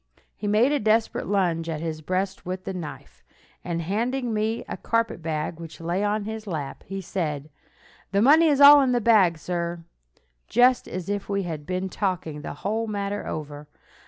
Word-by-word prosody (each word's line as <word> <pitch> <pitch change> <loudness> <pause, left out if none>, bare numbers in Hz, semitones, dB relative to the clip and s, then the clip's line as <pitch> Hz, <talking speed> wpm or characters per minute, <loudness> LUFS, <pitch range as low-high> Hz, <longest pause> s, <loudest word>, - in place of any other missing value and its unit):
He 210 - -5
made 220 +6 +4
a 295 - +2
desperate 220 +1 +1
lunge 175 -5 0
at 155 -2 -3
his 155 -1 -4
breast 185 +4 -2
with 185 +1 -5
the 190 - -4
knife, 165 -5 -8 0.4
and 170 -1 -3
handing 235 +6 -1
me 220 +2 -1
a - - -4
carpetbag 165 -8 -2
which 165 -1 -9
lay 170 +4 -1
on 210 0 0
his 220 0 -6
lap, 155 -7 -5
he 195 +1 -4
said, 155 -6 -3 0.6
"The 200 - +2
money 315 +6 +6
is 290 -3 +3
all 285 0 +10
in 260 -2 +2
this 240 -2 +1
bag, 195 -8 +5
sir," 170 +1 -3 0.6
just 245 +2 +4
as 180 -2 -5
if 205 0 -3
we 200 -1 0
had 155 -4 -6
been 185 +1 -2
talking 180 -6 -3
the 145 - -6
whole 220 +3 0
matter 205 -1 -3
over. 150 -1 -6
195 Hz, 180 wpm, -25 LUFS, 165-220 Hz, 0.6 s, all